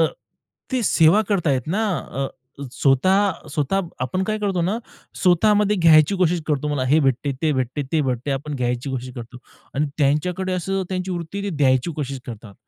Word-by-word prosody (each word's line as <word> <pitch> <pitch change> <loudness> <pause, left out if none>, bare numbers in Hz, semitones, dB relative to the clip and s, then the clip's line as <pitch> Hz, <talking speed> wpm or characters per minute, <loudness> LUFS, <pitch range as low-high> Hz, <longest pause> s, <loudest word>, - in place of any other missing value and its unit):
अ, - - +6 0.7
ते 255 -2 +1
सेवा 170 -1 +4
करतायत 160 -10 +1
ना 210 +7 0
अ, 135 0 -4 0.5
स्वतः 185 +10 +2
स्वतः 150 +7 0 0.2
आपण 130 +9 -1
काय 215 +2 -1
करतो 195 -4 -1
ना 195 +7 0 0.4
स्वतःमध्ये 210 +3 +3
घ्यायची 160 0 +5
कोशिश 175 -2 +2
करतो 150 -1 0
मला 145 -3 -1
हे 145 +5 +4
भेटते, 135 0 +1
ते 155 -2 +2
भेटते, 130 +1 -2
ते 160 - +3
भेटते. 130 0 -2
आपण 140 +2 -3
घ्यायची 125 +2 -2
कोशिश 130 -1 -5
करतो 120 0 -9 0.4
आणि 145 +2 +1
त्यांच्याकडे 180 +6 0
असं 190 +2 -1
त्यांची 185 0 -3
वृत्ती 180 +3 -4
द्यायची 135 -3 +2
ते - - -8
कोशिश 140 -3 -4
करतात. 110 -3 -9
155 Hz, 170 wpm, -22 LUFS, 135-185 Hz, 0.7 s, अ